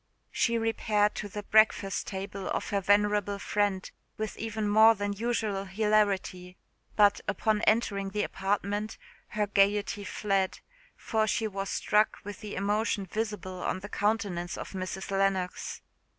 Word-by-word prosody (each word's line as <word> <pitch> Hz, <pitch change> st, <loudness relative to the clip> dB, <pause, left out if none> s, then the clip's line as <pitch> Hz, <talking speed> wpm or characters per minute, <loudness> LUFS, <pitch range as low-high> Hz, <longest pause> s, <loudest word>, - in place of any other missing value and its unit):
She 235 Hz, -1 st, +1 dB
repaired 220 Hz, -2 st, +1 dB
to 210 Hz, -, -4 dB
the 205 Hz, +1 st, -6 dB
breakfast 215 Hz, -2 st, +3 dB
table 195 Hz, 0 st, -5 dB
of -, -, -2 dB
her 200 Hz, -1 st, +1 dB
venerable 205 Hz, 0 st, +2 dB
friend 200 Hz, -2 st, 0 dB, 0.3 s
with 215 Hz, -1 st, -3 dB
even 220 Hz, -1 st, -3 dB
more 220 Hz, +2 st, +7 dB
than 205 Hz, 0 st, -2 dB
usual 215 Hz, -2 st, -1 dB
hilarity; 195 Hz, -3 st, 0 dB, 0.4 s
but, 205 Hz, -1 st, +4 dB
upon 215 Hz, -2 st, +1 dB
entering 200 Hz, -3 st, +2 dB
the 210 Hz, +1 st, -1 dB
apartment, 205 Hz, +2 st, -2 dB, 0.3 s
her 210 Hz, -1 st, -1 dB
gaiety 205 Hz, +1 st, +1 dB
fled; 195 Hz, -2 st, -1 dB, 0.3 s
for 220 Hz, -2 st, 0 dB
she 220 Hz, -, 0 dB
was 195 Hz, -1 st, -4 dB
struck 210 Hz, +1 st, +2 dB
with 205 Hz, -1 st, -7 dB
the 210 Hz, -2 st, -7 dB
emotion 205 Hz, +1 st, 0 dB
visible 190 Hz, -3 st, -4 dB
on 185 Hz, -, -2 dB
the 205 Hz, -, -8 dB
countenance 200 Hz, -5 st, -1 dB
of -, -, -7 dB
Mrs. 190 Hz, 0 st, -5 dB
Lennox. 195 Hz, -2 st, -1 dB
205 Hz, 140 wpm, -29 LUFS, 195-215 Hz, 0.4 s, more